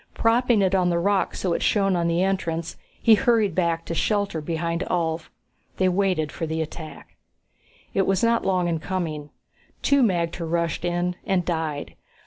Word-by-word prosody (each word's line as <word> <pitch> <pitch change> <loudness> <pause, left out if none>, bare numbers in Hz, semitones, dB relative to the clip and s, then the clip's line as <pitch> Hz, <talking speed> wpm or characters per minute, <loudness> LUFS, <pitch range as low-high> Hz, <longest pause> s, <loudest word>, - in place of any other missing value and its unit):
Propping 230 -2 +3
it 190 0 +1
on 180 -2 +3
the 170 - +1
rocks 195 +3 0
so 180 -3 0
it - - -1
shone 195 -3 +2
on 170 -1 +1
the 170 +2 +1
entrance, 170 -4 -2 0.2
he 225 - +5
hurried 215 -3 +3
back 170 -1 0
to - - -4
shelter 200 -2 0
beside 170 +1 -2
Ulv. 165 -2 -1 0.5
They 185 - +3
waited 180 -5 0
for 165 - -4
the 160 +1 -2
attack. 155 -1 -7 0.8
It 195 - +1
was 195 +1 +1
not 230 0 +3
long 180 -2 +1
in 165 -2 -1
coming. 155 -4 -4 0.5
Two 280 -1 +4
magter 170 -6 0
rushed 170 0 -1
in, 175 +1 -1
and 190 -4 0
died. 160 -4 -3
175 Hz, 170 wpm, -24 LUFS, 165-195 Hz, 0.8 s, he